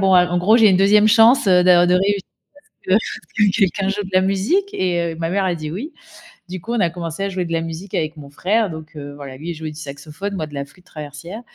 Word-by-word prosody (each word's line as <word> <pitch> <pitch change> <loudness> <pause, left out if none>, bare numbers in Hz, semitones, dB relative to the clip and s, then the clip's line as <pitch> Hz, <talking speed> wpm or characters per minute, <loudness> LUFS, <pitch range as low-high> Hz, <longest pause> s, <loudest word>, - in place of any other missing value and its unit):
bon, 190 -1 +3
a 180 -1 +6
en 175 0 -1
gros: 210 +6 +4
«J'ai 220 -3 +6
une 185 - +4
2e 210 +3 +5
chance, 225 +3 +5
heu, 180 -2 +5
de 175 -1 +5
de 180 - +3
réussir 195 +2 +1
à - - -60 0.4
ce - - -6
que - - +5
à - - +6
ce 220 - -4
que 200 - +3
quelqu'un 195 -1 +1
joue 205 +1 -2
de 190 - -9
la 185 - +4
musique» 205 - 0
et 175 -2 -1
heu, - - -9
ma 165 0 -3
mère 195 +1 0
a 180 -2 0
dit: 155 -2 -6
«Oui», 240 - -6 0.6
du 185 -1 -6
coup, 235 - -5
on 240 - 0
a 175 - +2
commencé 170 +1 -5
à 200 - -1
jouer 185 -2 -3
de 165 - -7
la 165 - 0
musique 165 +4 -7
avec 155 0 -2
mon 145 -2 -11
frère 205 +8 0
donc 160 0 -10
heu, 145 -1 -8
voilà, 140 -2 -9
lui, 160 +4 -7
il - - -4
jouait 160 0 -6
du 150 - -11
saxophone, 155 +7 -7
moi, 155 -5 -3
de 150 - -15
la 140 0 -4
flûte 180 +6 -23
traversière 155 +8 -9
180 Hz, 290 wpm, -20 LUFS, 160-200 Hz, 0.6 s, a